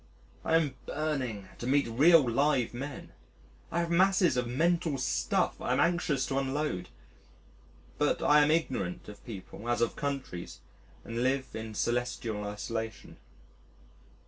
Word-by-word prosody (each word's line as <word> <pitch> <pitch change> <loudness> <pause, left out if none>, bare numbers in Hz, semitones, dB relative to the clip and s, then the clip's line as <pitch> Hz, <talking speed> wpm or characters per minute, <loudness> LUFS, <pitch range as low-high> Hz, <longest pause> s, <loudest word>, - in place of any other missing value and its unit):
I 160 - +2
am 155 -5 +2
burning 130 -10 -2
to 120 - -4
meet 140 0 +3
real 145 +5 +6
live 130 0 +2
men, 135 +3 -6 0.6
I 170 - +1
have 170 0 -2
masses 185 -2 +4
of 125 -1 0
mental 165 +3 +1
stuff 130 -1 0
I 125 - 0
am 130 - +1
anxious 165 -6 +2
to 135 0 0
unload. 135 -9 -2 1.1
But - - +1
I 150 0 +6
am 145 - +4
ignorant 130 - -1
of 105 - -12
people 110 +1 -7
as 120 - +1
of 115 -1 +1
countries 135 -11 -4 0.5
and 115 +1 -3
live 130 0 +1
in 110 -1 -6
celestial 120 -2 -1
isolation. 110 +2 -5
130 Hz, 140 wpm, -30 LUFS, 115-150 Hz, 1.1 s, real